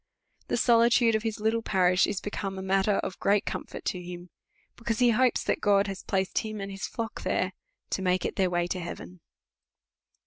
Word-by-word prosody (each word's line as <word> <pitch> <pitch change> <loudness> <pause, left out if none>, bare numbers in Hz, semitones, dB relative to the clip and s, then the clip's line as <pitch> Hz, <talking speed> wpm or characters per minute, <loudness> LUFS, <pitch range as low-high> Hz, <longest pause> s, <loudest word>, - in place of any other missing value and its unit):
The - - 0
solitude 235 0 +4
of 220 - +1
his 225 -1 -3
little 220 +2 +1
parish 185 -3 +3
is 205 -2 -2
be 205 - -6
come 195 -2 -4
matter 195 +2 +2
of 185 - -5
great 200 0 +2
comfort - - -6
to 180 - -2
him; 175 0 -9 0.4
because 230 -1 -2
he 245 -1 +4
hopes 250 +2 +2
that - - -1
God 200 -1 +4
has 195 -2 -5
placed 190 -1 0
him 215 -1 -5
and 195 0 -5
his 195 0 -4
Hock 230 -1 -5
there, - - -1 0.4
to - - -1
make 185 -1 +1
it - - -2
their 190 -1 +2
way 175 -1 0
to 180 +1 -3
heaven. 180 +1 -8
195 Hz, 200 wpm, -28 LUFS, 185-225 Hz, 0.4 s, solitude